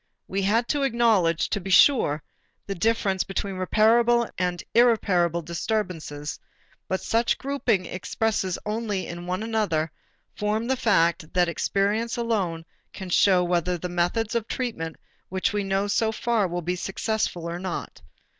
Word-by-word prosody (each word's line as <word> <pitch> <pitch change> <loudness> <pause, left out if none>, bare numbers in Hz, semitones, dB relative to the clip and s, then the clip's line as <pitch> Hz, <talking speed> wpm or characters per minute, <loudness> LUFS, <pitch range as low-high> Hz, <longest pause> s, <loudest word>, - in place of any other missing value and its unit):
We 195 +1 -1
had 225 +5 +2
to 290 - +1
acknowledge, 225 - +2
to 205 - -1
be 195 - -6
sure, 180 - +5 0.4
the 200 - -3
difference 195 0 +1
between 195 0 -4
reparable 230 +5 +3
and 180 -1 -2
irreparable 185 -8 +3
disturbances, 170 -5 -3 0.5
but 190 - -1
such 230 +1 +1
grouping 270 -9 0
expresses 190 0 -1
only 210 -3 -2
in 175 +1 -7
another 185 -5 -1 0.4
form 210 +2 -1
the 265 +2 +1
fact 170 -8 +2
that 180 -1 +4
experience 205 - 0
alone 195 -9 -1 0.3
can 190 -2 -7
show 185 0 +4
whether 175 0 0
the 180 +2 -5
methods 180 +7 0
of 230 -2 -1
treatment 190 - -3 0.3
which 190 +2 -1
we 205 -1 0
know 195 +1 0
so 220 +2 +1
far 225 -2 0
will 175 0 -4
be 180 +2 -1
successful 190 -2 -2
or 170 +1 -4
not. 185 -2 -5
195 Hz, 145 wpm, -25 LUFS, 175-225 Hz, 0.5 s, sure